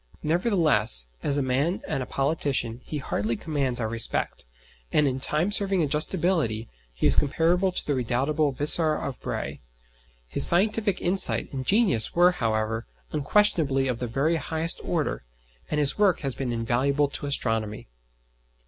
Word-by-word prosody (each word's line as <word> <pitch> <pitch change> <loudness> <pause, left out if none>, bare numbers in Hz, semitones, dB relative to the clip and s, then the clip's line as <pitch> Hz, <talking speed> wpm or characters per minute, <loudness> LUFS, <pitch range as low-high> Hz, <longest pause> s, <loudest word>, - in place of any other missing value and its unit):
Nevertheless, 155 - +1 0.2
as 145 - -1
a 140 - 0
man 140 +8 -1
and 150 -4 -2
a 125 - -5
politician 135 -5 -2
he 155 - -6
hardly 115 -4 -2
commands 135 -1 -2
our 110 - -2
respect, 110 - -2 0.5
and 150 -1 +3
in 130 -1 -2
time 155 +8 0
serving 195 -4 +1
adjustability 150 - 0 0.2
he - - -4
is - - +4
comparable 170 +6 +1
to - - -3
the 145 - -1
redoubtable 135 +4 0
Vicar 155 +3 +5
of 135 -4 -6
Bray. - - -5 0.7
His - - +4
scientific 205 +2 +2
insight 185 -3 +2
and 130 -1 -5
genius 195 - +2
were 175 +1 +5
however 110 -6 -2 0.2
unquestionably 150 -4 +1
of 125 -2 -3
the 125 - -3
very 145 +8 0
highest 160 +3 -2
order, 165 -4 -2 0.5
and 150 - -1
his 145 +6 +1
work 200 -4 +2
has 135 -2 -3
been 130 -1 -4
invaluable 130 +5 0
to 145 - -4
astronomy. 115 -6 -1
145 Hz, 150 wpm, -25 LUFS, 125-170 Hz, 0.7 s, Vicar